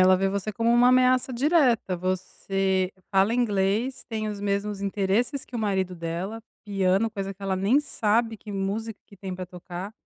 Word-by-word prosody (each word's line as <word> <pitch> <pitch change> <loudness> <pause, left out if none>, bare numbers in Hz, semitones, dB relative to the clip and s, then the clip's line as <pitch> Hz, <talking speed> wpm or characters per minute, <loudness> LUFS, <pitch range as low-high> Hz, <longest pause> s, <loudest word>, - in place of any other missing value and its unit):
ela 185 0 +6
vê 195 +1 +1
você 200 +2 -2
como 230 +1 +1
uma 240 +1 +6
ameaça 255 0 +4
direta, 245 - +2
você 185 +1 -1 0.2
fala 195 +3 +3
inglês, 220 +2 0
tem 215 -2 -2
os 205 -1 -5
mesmos 200 0 -1
interesses 200 +7 0
que 240 - -7
o - - -2
marido 190 -4 0
dela, 175 +6 -4 0.2
piano, 195 +1 +1
coisa 195 -1 -4
que 200 - -17
ela 190 -1 0
nem 215 +10 +3
sabe 225 -4 0
que 210 0 -9
música 205 +3 -3
que 200 - -16
tem 190 -1 -6
para 185 0 -6
tocar. 180 +3 -8
200 Hz, 180 wpm, -26 LUFS, 190-225 Hz, 0.2 s, ela